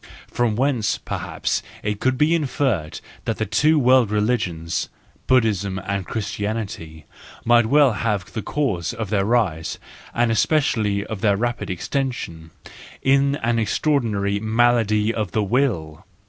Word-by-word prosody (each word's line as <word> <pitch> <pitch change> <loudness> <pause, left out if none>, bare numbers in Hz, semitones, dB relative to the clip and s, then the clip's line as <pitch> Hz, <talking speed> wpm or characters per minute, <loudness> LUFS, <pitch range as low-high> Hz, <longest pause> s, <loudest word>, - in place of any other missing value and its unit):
From 120 -3 -1
whence 125 -4 +1
perhaps - - -3 0.2
it 105 -1 -2
could 130 +2 +1
be 150 +4 +3
inferred 130 - -1 0.3
that 115 - -1
the 110 - -1
two 150 +10 +3
world 130 -4 +4
religions, 105 -7 -1 0.4
Buddhism 105 -7 +2
and 100 -1 -3
Christianity, 100 -7 -4 0.4
might 120 -1 +5
well 140 +1 +5
have 105 -3 -1
had - - -20
the 110 - -3
cause 120 - -2
of 110 -4 -5
their 100 -2 +1
rise, 100 -9 0 0.3
and 120 -1 +1
especially 110 -6 +1
of 110 -3 -6
their 100 -3 +3
rapid 120 +2 -2
extension, 95 - -3 0.5
in 140 +1 +3
an 115 0 +1
extraordinary 110 -5 0
malady 110 -1 +2
of 105 -5 -3
the 110 - +1
will. 100 - -1
110 Hz, 135 wpm, -22 LUFS, 100-125 Hz, 0.5 s, might